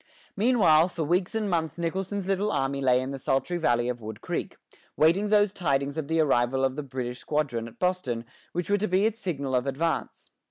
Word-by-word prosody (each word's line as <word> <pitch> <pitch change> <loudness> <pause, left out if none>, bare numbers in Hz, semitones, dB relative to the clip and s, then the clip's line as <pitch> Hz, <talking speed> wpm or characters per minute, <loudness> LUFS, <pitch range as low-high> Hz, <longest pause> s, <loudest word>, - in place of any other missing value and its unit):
Meanwhile, 195 -8 +4
for 170 -2 -3
weeks 175 +6 0
and 220 -2 0
months 165 -4 -1
Nicholson's 190 +3 -3
little 195 +2 +1
army 135 -2 -1
lay 130 -1 +3
in 130 +1 -4
the 135 - -5
sultry 135 +7 0
valley 120 -6 +2
of 125 -1 -3
Wood 110 -1 -7
Creek, - - -4 0.4
waiting 170 +7 +4
those 205 -1 +3
tidings 140 -5 0
of 160 -3 -3
the 160 +1 +1
arrival 135 -3 +2
of 130 0 -1
the 150 - -3
British 125 -3 -5
squadron 135 -7 -2
at 115 - -14
Boston 165 -11 -1 0.3
which 175 -1 -3
were 205 - +3
to 215 - 0
be 185 +3 +2
its 225 0 0
signal 140 - -3
of 125 +1 +1
advance. 160 +5 -2
155 Hz, 205 wpm, -27 LUFS, 130-185 Hz, 0.4 s, Meanwhile